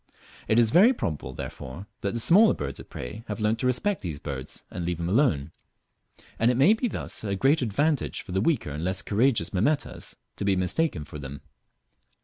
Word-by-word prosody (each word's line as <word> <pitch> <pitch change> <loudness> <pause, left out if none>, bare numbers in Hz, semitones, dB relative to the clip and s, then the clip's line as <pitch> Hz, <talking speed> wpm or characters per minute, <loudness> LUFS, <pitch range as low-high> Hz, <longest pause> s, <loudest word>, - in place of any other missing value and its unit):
It 110 - +2
is 115 -2 +4
very 215 - +6
probable, 75 - -4
therefore, 65 +7 -7
that 100 +3 -2
the - - 0
smaller 200 - +6
birds 70 -2 -5
of - - -11
prey 105 - -7
have - - -4
learnt 110 +1 +1
to 125 - 0
respect 170 +11 0
these 85 -6 -4
birds 70 -3 -6
and 90 - -4
leave 85 0 -2
them 85 0 -3
alone, 95 - +2 0.9
and 115 - +4
it 125 - +1
may 150 +11 +6
thus 225 0 -2
be 110 - -5
a 100 - -1
great 140 +9 +3
advantage 140 +6 0
for - - -10
the 95 +1 0
weaker 125 - 0
and 75 +3 -5
less 95 +1 0
courageous 110 -4 +1
Mimetas 140 +11 -1 0.2
to - - -3
be 100 -1 +2
mistaken 90 - 0
for 75 0 -9
them. 70 0 -8
105 Hz, 200 wpm, -26 LUFS, 85-135 Hz, 0.9 s, very